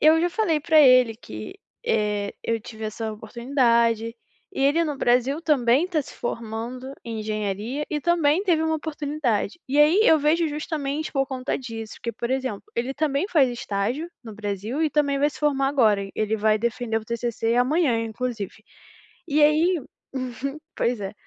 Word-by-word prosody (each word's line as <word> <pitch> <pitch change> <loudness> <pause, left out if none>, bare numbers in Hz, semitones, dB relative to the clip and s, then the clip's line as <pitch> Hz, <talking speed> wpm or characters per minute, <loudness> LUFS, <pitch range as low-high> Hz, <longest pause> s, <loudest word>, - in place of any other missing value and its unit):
eu 315 +2 +6
já 350 - +2
falei 350 -7 +1
para 315 0 +5
ele 255 -4 +6
que, 110 - -9 0.3
eh, 210 -2 0
eu 230 0 0
tive 220 0 -9
essa 220 +1 -4
oportunidade, 235 0 +1 0.4
e - - -3
ele 310 +5 +3
no 295 -3 -3
Brasil, 250 +5 +2
também 275 +1 +3
tá 320 -5 0
se - - -12
formando 235 +3 -5
em 225 -2 -4
engenharia 215 +6 -3
e 300 - -1
também 340 +1 +3
teve 330 -5 +2
uma 320 0 +1
oportunidade, 295 -6 -2
e 285 +2 +1
aí 310 +7 +6
eu 320 - +6
vejo 320 +3 +2
justamente 300 0 -3
por 270 -1 +1
conta 260 -1 -3
disso 225 -4 -7
que, 235 - -3
por 240 +1 -4
exemplo, 260 -6 -2
ele 245 +3 -1
também 295 +2 0
faz 280 -7 +4
estágio 240 +8 -2
no 220 -2 -8
Brasil 210 +7 -3
e 315 - +2
também 285 -2 +1
vai 290 +1 +2
se - - -12
formar 275 -2 +2
agora, 215 -8 +3
e 195 - -9
ele 215 0 0
vai 215 0 +2
defender 230 0 -1
o 215 - -14
TCC 235 0 -1
amanhã, 255 -2 +2
inclusive. 220 -3 -5 0.7
E 300 -1 +2
aí 315 +3 +4 0.3
Uhum, 255 +2 -4 0.2
pois 235 -2 0
é. 195 0 -4
255 Hz, 175 wpm, -24 LUFS, 225-300 Hz, 0.7 s, eu